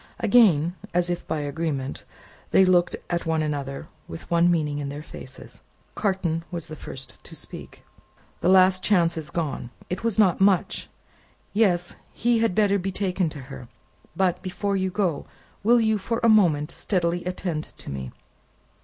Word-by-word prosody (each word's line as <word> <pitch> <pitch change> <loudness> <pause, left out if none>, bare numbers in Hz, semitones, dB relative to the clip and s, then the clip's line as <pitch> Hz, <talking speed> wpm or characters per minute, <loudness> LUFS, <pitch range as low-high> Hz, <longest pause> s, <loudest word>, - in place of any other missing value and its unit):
Again, 195 -8 +4 0.2
as 175 0 +2
if 175 - -4
by 155 - -1
agreement, 145 -2 -3 0.4
they 190 - +5
looked 180 -1 +3
at 170 -1 -2
one 160 -1 +1
another 140 -2 -4 0.2
with 80 - -10
one 170 +1 +4
meaning 150 -4 0
in 140 -1 -3
their 145 +2 -6
faces. - - -11 0.3
Carton 185 -5 -1
was 170 -3 -5
the 155 -2 -8
first 135 -2 -9
to - - -12
speak: - - -10 0.6
"The 175 - +1
last 185 0 +5
chance 175 -5 +3
is 155 -2 -5
gone: 150 -7 -3 0.2
it 180 - -3
was 230 -3 0
not 195 -4 +4
much. 195 -2 +2 0.6
Yes; 180 -5 +2 0.2
he 235 0 +1
had 225 -5 +1
better 200 -2 +3
be 195 +1 -3
taken 185 -3 0
to 150 -2 -8
her. 130 -2 -10 0.5
But, 185 -1 +1
before 200 +2 -2
you 190 -1 0
go, 180 -6 -1 0.4
will 240 +3 +5
you, 220 -2 +2
for 230 +4 -2
a - - +5
moment, 165 -9 +4
steadily 175 -3 -1
attend 180 -4 -3
to - - -11
me? 65 -2 -5
175 Hz, 165 wpm, -25 LUFS, 155-195 Hz, 0.6 s, they